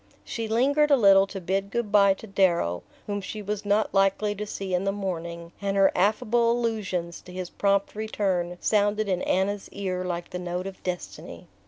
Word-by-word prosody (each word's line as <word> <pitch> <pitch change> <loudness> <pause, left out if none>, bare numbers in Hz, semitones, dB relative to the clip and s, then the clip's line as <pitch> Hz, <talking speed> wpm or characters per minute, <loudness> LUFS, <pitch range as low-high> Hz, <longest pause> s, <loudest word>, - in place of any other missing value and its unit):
She 230 -2 -4
lingered 280 +7 +3
a 280 - +6
little 195 -3 +6
to 195 - -6
bid 195 +2 -1
good 230 -1 -2
bye 200 -2 +5
to 220 - -11
Darrow, 175 - +1 0.2
whom 205 -1 -3
she 210 +2 -6
was 210 0 -3
not 205 +1 +1
likely 195 +2 +2
to 210 +1 -5
see 195 -2 -4
in 180 +1 +1
the 195 - +1
morning; 170 -4 -5
and 200 0 -1
her 195 0 +5
affable 220 +4 +2
allusions 205 -8 -2
to 180 - -13
his 180 -1 -6
prompt 200 -1 +1
return 190 -5 -1
sounded 210 0 +1
in 185 -2 0
Anna's 195 +2 0
ear 185 -2 -3
like 175 -1 -4
the 180 - -4
note 180 +1 -3
of 195 -1 -8
destiny. 180 -1 -6
195 Hz, 190 wpm, -26 LUFS, 180-210 Hz, 0.2 s, a